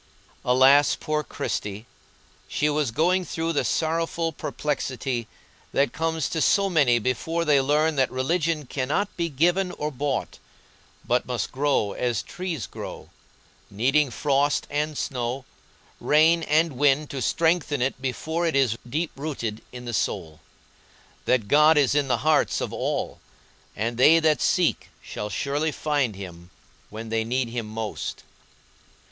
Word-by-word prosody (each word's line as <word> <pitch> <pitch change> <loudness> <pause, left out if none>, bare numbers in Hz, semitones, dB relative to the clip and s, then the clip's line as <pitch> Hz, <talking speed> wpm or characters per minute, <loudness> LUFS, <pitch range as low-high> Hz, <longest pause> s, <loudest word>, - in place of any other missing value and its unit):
Alas, 135 +3 +5
poor 155 0 -1
Christie! 105 -5 -4 0.6
she 150 +1 0
was 150 -3 0
going 175 +9 +2
through 165 -1 -2
the 145 - +1
sorrowful 165 +1 0
perplexity 130 -6 -3 0.5
that 140 +1 +2
comes 160 -2 -1
to 160 - -2
so 195 +3 +3
many 140 -8 +4
before 160 +8 -1
they 145 -3 +4
learn 150 +3 +1
that 130 -1 +3
religion 155 +3 -1
cannot 145 +11 -2
be 170 -1 -1
given 175 +6 +1
or 150 +1 -3
bought, 140 0 -3 0.7
but - - +1
must - - -2
grow 135 -6 +1
as 120 -2 -1
trees 175 -7 -4
grow, - - -9 0.6
needing 135 +8 +2
frost 140 +4 +1
and 150 +1 -1
snow, 125 0 -3 0.5
rain 160 +3 +4
and 155 -2 +1
wind 145 0 +3
to 135 - -4
strengthen 160 +2 +1
it 130 +1 -1
before 160 +6 -2
it 160 - -1
is 125 -5 +2
deep 155 +6 -1
rooted 135 -7 -4
in 125 0 -9
the 120 - -5
soul; 80 -6 -2 0.9
that 120 -5 +2
God 150 +5 +5
is 140 -3 +4
in 145 -1 +1
the 130 - +2
hearts 155 -1 +3
of - - -4
all, - - -2 0.6
and 115 +2 -2
they 155 +6 +7
that 155 -4 +2
seek - - +1
shall 105 - -6
surely 145 - -1
find 145 -8 -1
Him 85 -3 -10 0.4
when 110 +1 -7
they 115 0 0
need 125 +1 -1
Him 115 -2 -4
most. 110 0 -5
145 Hz, 145 wpm, -25 LUFS, 125-160 Hz, 0.9 s, they